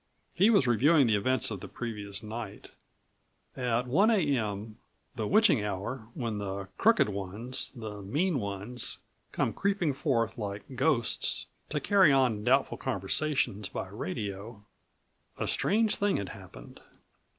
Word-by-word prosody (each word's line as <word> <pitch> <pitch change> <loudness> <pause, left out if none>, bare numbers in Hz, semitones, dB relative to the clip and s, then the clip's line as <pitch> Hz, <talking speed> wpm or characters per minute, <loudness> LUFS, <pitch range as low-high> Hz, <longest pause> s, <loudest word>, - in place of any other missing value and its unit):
He 195 +6 +4
was 200 -12 +5
reviewing 135 +5 +4
the 110 -2 +3
events 125 +3 +1
of 100 - -4
the - - -8
previous 105 -4 -5
night. 110 +2 -7 0.8
At 125 -1 0
1:00 200 - +4 0.2
a.m., 105 -2 -3 0.3
the 110 - -3
witching 215 - +4
hour 105 +4 -4
when 115 -5 -3
the 100 -1 -5
crooked 225 - +4
ones, 100 +5 -4
the 110 -3 -7
mean 150 - 0
ones, 100 +4 -4 0.3
come - - 0
creeping 195 -7 0
forth 120 -5 0
like 100 +4 -6
ghosts 130 -3 +1 0.2
to 150 - -1
carry 190 0 +5
on 125 -6 +2
doubtful 135 +4 +2
conversations 105 -1 0
by 95 - -5
radio, 100 +2 -5 0.7
a - - -2
strange 220 +1 +2
thing 205 -1 +1
had 100 -3 -4
happened. - - -12
115 Hz, 135 wpm, -29 LUFS, 100-140 Hz, 0.8 s, was